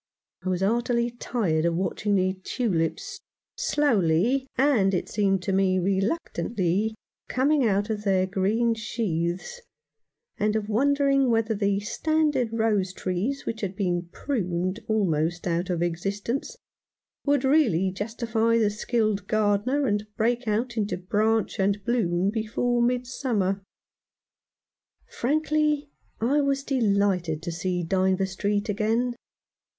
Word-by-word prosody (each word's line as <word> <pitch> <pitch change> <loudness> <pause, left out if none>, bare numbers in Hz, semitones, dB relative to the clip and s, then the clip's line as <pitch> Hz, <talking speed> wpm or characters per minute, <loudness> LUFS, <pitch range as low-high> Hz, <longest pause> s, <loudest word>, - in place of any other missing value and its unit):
I 185 - -2
was 185 0 -1
heartily 235 +3 +1
tired 215 -9 -1
of 170 0 +1
watching 200 +3 0
the 185 -1 +2
tulips 245 - -2 0.4
slowly, 240 - +2
and, 235 -8 +3
as - - +3
it - - -11
seemed 195 -3 +1
to 195 - -1
me, 190 -1 +3
reluctantly, 195 - 0 0.3
coming 270 0 +2
out 205 +1 +1
of 210 -1 -3
their 190 -2 +2
green 205 +5 +1
sheaths, 215 - -3 0.8
and 210 +1 +1
of 215 -1 -1
wonder 280 +6 +2
ing 275 -2 +3
whether 225 -1 +2
the 200 -1 +1
standard 295 +2 0
rose 215 -5 +1
trees 190 +10 -2
which 225 - -4
had 195 -2 -3
been 175 -3 -1
pruned 185 -7 -2
almost 175 -6 0
out 175 +1 -1
of 175 -1 0
existence 200 - -3 0.7
would 285 -2 +2
really 240 - +3
justify 225 +3 0
the 215 -2 +2
skilled 210 -2 -1
gardener, 215 +6 +1
and 205 -2 0
break 240 +2 0
out 230 +3 -1
into 210 -3 -1
branch 215 +5 0
and 200 +1 0
bloom 195 -5 +1
before 235 +2 0
midsummer. 240 -5 0 1.5
Frankly 300 +1 0 0.3
I 275 +6 +2
was 275 -1 0
delighted 200 - +1
to 175 - -3
see 180 +1 -2
Dynevor 190 +2 +1
Street 205 +3 -1
again. 225 +4 0
210 Hz, 125 wpm, -26 LUFS, 190-240 Hz, 1.5 s, and